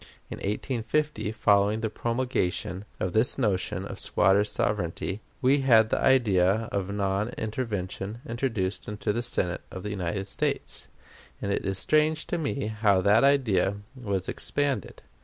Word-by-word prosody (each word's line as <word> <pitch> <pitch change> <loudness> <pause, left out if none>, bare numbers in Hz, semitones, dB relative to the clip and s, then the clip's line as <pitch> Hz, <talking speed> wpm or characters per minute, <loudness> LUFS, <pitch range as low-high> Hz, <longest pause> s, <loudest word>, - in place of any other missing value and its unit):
In - - -4
1850, 120 +4 -1
following 105 0 +3
the 110 - -1
promulgation 105 -6 -2
of 90 - -2
this 110 +3 +3
notion 105 -8 0
of - - -7
squatter 100 +1 +3
sovereignty, 100 -1 -2 0.2
we 135 +3 +4
had 115 -5 +5
the - - +2
idea 110 -4 +3
of 100 -1 -2
non 100 +1 0
intervention 105 -2 -3
introduced 115 -6 -2
into 105 0 -2
the 120 - -1
Senate 90 -6 -2
of 95 - -8
the 105 - -4
United 95 0 -2
States, 95 - -3 0.5
and 100 - -2
it 100 - -1
is 95 -1 +1
strange 155 +7 +2
to - - -2
me 140 -3 -2
how 105 -2 +2
that 105 +5 +4
idea 115 -9 +3 0.3
has 100 -4 -1
expanded. 140 -8 -2
105 Hz, 145 wpm, -27 LUFS, 95-120 Hz, 0.5 s, had